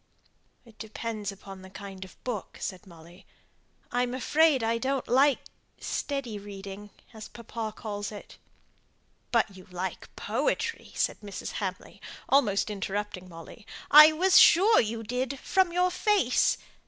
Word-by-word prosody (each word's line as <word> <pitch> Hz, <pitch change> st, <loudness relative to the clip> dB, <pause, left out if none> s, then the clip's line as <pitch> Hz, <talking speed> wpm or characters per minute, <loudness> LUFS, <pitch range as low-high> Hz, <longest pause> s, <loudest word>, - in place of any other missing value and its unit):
"It 225 Hz, -2 st, -19 dB
depends 220 Hz, -2 st, -5 dB
upon 195 Hz, -1 st, -11 dB
the 190 Hz, -, -12 dB
kind 195 Hz, 0 st, -9 dB
of 190 Hz, -, -15 dB
book," 235 Hz, -6 st, -5 dB
said 190 Hz, 0 st, -6 dB
Molly. 170 Hz, +2 st, -16 dB, 0.6 s
"I'm 245 Hz, 0 st, 0 dB
afraid 295 Hz, 0 st, +3 dB
I 230 Hz, +1 st, 0 dB
don't 265 Hz, +1 st, -2 dB
like 270 Hz, +2 st, +4 dB, 0.4 s
'steady 265 Hz, -7 st, -3 dB
reading,' 200 Hz, 0 st, -9 dB, 0.2 s
as 220 Hz, -1 st, -9 dB
papa 230 Hz, -1 st, -6 dB
calls 205 Hz, -2 st, -5 dB
it." 205 Hz, -, -11 dB, 0.9 s
"But 220 Hz, -4 st, +1 dB
you 185 Hz, -1 st, -14 dB
like 180 Hz, +1 st, -5 dB
poetry!" 460 Hz, -, -2 dB
said -, -, 0 dB
Mrs. 205 Hz, -2 st, -7 dB
Hamley, -, -, -6 dB, 0.3 s
almost 220 Hz, -7 st, +2 dB
interrupting 200 Hz, -2 st, -4 dB
Molly. 170 Hz, +6 st, -12 dB, 0.2 s
"I 305 Hz, +2 st, +10 dB
was 365 Hz, +4 st, +5 dB
sure 405 Hz, +7 st, +6 dB
you 225 Hz, +1 st, -4 dB
did, 250 Hz, +4 st, -3 dB
from 370 Hz, +6 st, +1 dB
your 360 Hz, +1 st, +2 dB
face. 395 Hz, -, +2 dB
220 Hz, 135 wpm, -28 LUFS, 195-265 Hz, 0.9 s, I